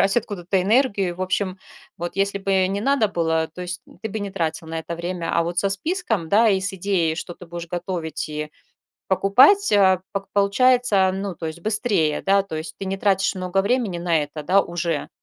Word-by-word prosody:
брать 195 Hz, +3 st, +3 dB
откуда-то 190 Hz, -4 st, -1 dB
энергию. 200 Hz, -5 st, +1 dB
В -, -, -10 dB
общем, 185 Hz, 0 st, -1 dB, 0.4 s
вот 175 Hz, 0 st, -4 dB
если 200 Hz, 0 st, 0 dB
бы 190 Hz, -1 st, +1 dB
не 200 Hz, +1 st, -2 dB
надо 270 Hz, -3 st, +2 dB
было, 160 Hz, -3 st, 0 dB
то 180 Hz, -, -8 dB
есть 180 Hz, +1 st, -5 dB, 0.2 s
ты 220 Hz, -, -3 dB
бы 215 Hz, +1 st, -4 dB
не 200 Hz, -1 st, -4 dB
тратил 165 Hz, -3 st, -3 dB
на 165 Hz, 0 st, -3 dB
это 170 Hz, +1 st, -5 dB
время. 170 Hz, 0 st, -3 dB
А -, -, +3 dB
вот 175 Hz, +1 st, -3 dB
со 195 Hz, -, +2 dB
списком, 220 Hz, -, -2 dB
да, 220 Hz, +2 st, +5 dB
и 190 Hz, -2 st, +2 dB
с 195 Hz, +1 st, -2 dB
идеей, 175 Hz, -4 st, 0 dB
что 175 Hz, 0 st, -6 dB
ты 180 Hz, -, -13 dB
будешь 170 Hz, 0 st, -7 dB
готовить 170 Hz, -3 st, -4 dB
и 150 Hz, 0 st, -5 dB, 0.6 s
покупать, 260 Hz, -, +5 dB
э, 190 Hz, -2 st, +5 dB
пок 195 Hz, 0 st, -4 dB
получается, 205 Hz, -1 st, +3 dB
ну, 195 Hz, -2 st, -4 dB
то 165 Hz, -, -7 dB
есть 160 Hz, +2 st, -6 dB
быстрее, 205 Hz, -7 st, +1 dB
да. 195 Hz, 0 st, +4 dB
То 190 Hz, -5 st, -7 dB
есть 155 Hz, 0 st, -5 dB
ты 195 Hz, -, -4 dB
не 195 Hz, +1 st, -2 dB
тратишь 195 Hz, -1 st, +1 dB
много 185 Hz, +1 st, 0 dB
времени 205 Hz, -4 st, 0 dB
на 165 Hz, -3 st, +1 dB
это, 150 Hz, +1 st, -7 dB
да, 190 Hz, +6 st, +3 dB
уже, 170 Hz, -3 st, -3 dB
190 Hz, 210 wpm, -22 LUFS, 170-200 Hz, 0.6 s, да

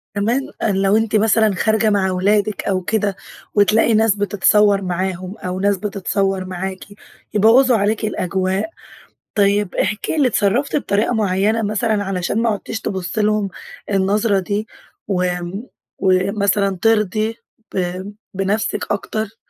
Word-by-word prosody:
كمان 240 Hz, +8 st, 0 dB
آآ، 215 Hz, -, +1 dB
لو 195 Hz, +2 st, +2 dB
أنتِ 225 Hz, -1 st, 0 dB
مثلًا 215 Hz, -1 st, +3 dB
خارجة 220 Hz, +2 st, +2 dB
مع 195 Hz, -2 st, +1 dB
ولادك 205 Hz, +3 st, +1 dB
أو 190 Hz, -2 st, 0 dB
كده 205 Hz, +1 st, -1 dB, 0.4 s
وتلاقي 215 Hz, +2 st, +4 dB
ناس 220 Hz, -1 st, +3 dB
بتتصور 205 Hz, 0 st, +3 dB
معاهم 185 Hz, +1 st, -3 dB
أو 185 Hz, 0 st, -4 dB
ناس 200 Hz, 0 st, +2 dB
بتتصور 195 Hz, -1 st, -1 dB
معاكِ، 185 Hz, +1 st, -5 dB, 0.5 s
يبوظوا 230 Hz, +4 st, +5 dB
عليكِ 215 Hz, +2 st, 0 dB
الأجواء. 190 Hz, -, -1 dB, 0.7 s
طيب، 200 Hz, -2 st, +2 dB
احكي 215 Hz, +9 st, -1 dB
لي 285 Hz, -4 st, +4 dB
اتصرفتِ 235 Hz, +5 st, +1 dB
بطريقة 215 Hz, -5 st, 0 dB
معينة 210 Hz, +1 st, +1 dB
مثلًا، 215 Hz, 0 st, 0 dB
علشان 195 Hz, +2 st, -1 dB
ما 230 Hz, -, +2 dB
عدتيش 220 Hz, +1 st, -4 dB
تبصي 190 Hz, +2 st, -3 dB
لهم 210 Hz, -1 st, +1 dB, 0.4 s
النظرة 200 Hz, +1 st, +2 dB
دي، 205 Hz, +3 st, -3 dB, 0.4 s
وامم، 180 Hz, +1 st, -2 dB, 0.3 s
ومثلًا 195 Hz, +1 st, +1 dB
ترضي 215 Hz, 0 st, +1 dB, 0.4 s
ب -, -, -2 dB, 0.6 s
بنفسك 195 Hz, +3 st, -1 dB
أكتر. 215 Hz, +1 st, -3 dB
205 Hz, 125 wpm, -19 LUFS, 190-220 Hz, 0.7 s, يبوظوا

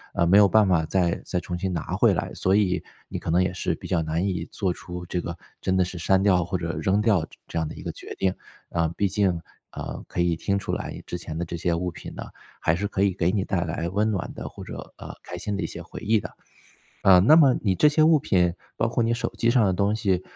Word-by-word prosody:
呃， 85 Hz, -, +3 dB
没 95 Hz, +4 st, +6 dB
有 100 Hz, -, +7 dB
办 110 Hz, +1 st, +4 dB
法 90 Hz, -4 st, +3 dB
再 85 Hz, +1 st, 0 dB
再 90 Hz, -, -1 dB
重 90 Hz, 0 st, -5 dB
新 95 Hz, +1 st, -1 dB
拿 85 Hz, -4 st, -3 dB
回 -, -, +4 dB
来， -, -, -3 dB
所 95 Hz, +1 st, +2 dB
以 95 Hz, -4 st, +2 dB, 0.2 s
你 -, -, -5 dB
可 -, -, -6 dB
能 85 Hz, +3 st, +3 dB
也 90 Hz, -1 st, -1 dB
是 90 Hz, -, -1 dB
比 -, -, -9 dB
较 85 Hz, -, +1 dB
难 80 Hz, +4 st, -1 dB
以 95 Hz, -2 st, -2 dB
做 95 Hz, -3 st, 0 dB
出 90 Hz, 0 st, -8 dB
这 90 Hz, 0 st, -2 dB
个 85 Hz, 0 st, -6 dB, 0.2 s
真 95 Hz, 0 st, +1 dB
的 90 Hz, -, +3 dB
是 90 Hz, 0 st, -6 dB
删 95 Hz, +3 st, +3 dB
掉 90 Hz, -3 st, +4 dB
或 90 Hz, +2 st, -2 dB
者 85 Hz, -1 st, -3 dB
扔 100 Hz, 0 st, +1 dB
掉 105 Hz, -6 st, +3 dB
这 -, -, -18 dB
这 85 Hz, -, -3 dB
样 80 Hz, -, -1 dB
的 -, -, -8 dB
一 -, -, -9 dB
个 -, -, -3 dB
决 -, -, -9 dB
定。 95 Hz, -1 st, +1 dB, 0.4 s
啊， 85 Hz, -1 st, +1 dB
毕 100 Hz, -, +2 dB
竟， 100 Hz, +1 st, +2 dB, 0.4 s
啊， -, -, -6 dB
可 -, -, -5 dB
以 85 Hz, -1 st, +2 dB
听 100 Hz, +4 st, -1 dB
出 100 Hz, -, -4 dB
来 -, -, -4 dB
之 90 Hz, -, -5 dB
前 80 Hz, -1 st, -6 dB
的 85 Hz, -, -2 dB
这 85 Hz, -, -5 dB
些 85 Hz, 0 st, 0 dB
物 90 Hz, +1 st, -2 dB
品 85 Hz, -1 st, -9 dB
呢， -, -, -5 dB, 0.4 s
还 80 Hz, -, +2 dB
是 100 Hz, +4 st, -2 dB
可 100 Hz, -1 st, 0 dB
以 100 Hz, -2 st, +2 dB
给 85 Hz, -1 st, +1 dB
你 95 Hz, -1 st, 0 dB
带 90 Hz, -4 st, 0 dB
来 85 Hz, 0 st, -3 dB
温 105 Hz, +4 st, +1 dB
暖 95 Hz, -3 st, -3 dB
的， -, -, -6 dB
或 -, -, -10 dB
者， -, -, -8 dB
呃， -, -, -8 dB
开 90 Hz, -, -8 dB
心 100 Hz, +3 st, -3 dB
的 100 Hz, -, -2 dB
一 -, -, -1 dB
些 -, -, -8 dB
回 -, -, -9 dB
忆 110 Hz, +1 st, +2 dB
的。 -, -, -8 dB, 0.7 s
啊， 95 Hz, -1 st, +7 dB
那 130 Hz, -, +7 dB
么 140 Hz, -6 st, +6 dB
你 95 Hz, -4 st, +1 dB
这 150 Hz, -, +4 dB
些 150 Hz, +1 st, +4 dB
物 160 Hz, 0 st, +6 dB
品， 90 Hz, -9 st, +2 dB, 0.2 s
包 115 Hz, -, +2 dB
括 120 Hz, +1 st, 0 dB
你 115 Hz, +1 st, +1 dB
手 115 Hz, 0 st, -1 dB
机 115 Hz, -, +2 dB
上 120 Hz, -1 st, +4 dB
的 95 Hz, -, +1 dB
东 100 Hz, +3 st, +1 dB
西， 100 Hz, -5 st, 0 dB
95 Hz, 295 characters per minute, -25 LUFS, 85-100 Hz, 0.7 s, 有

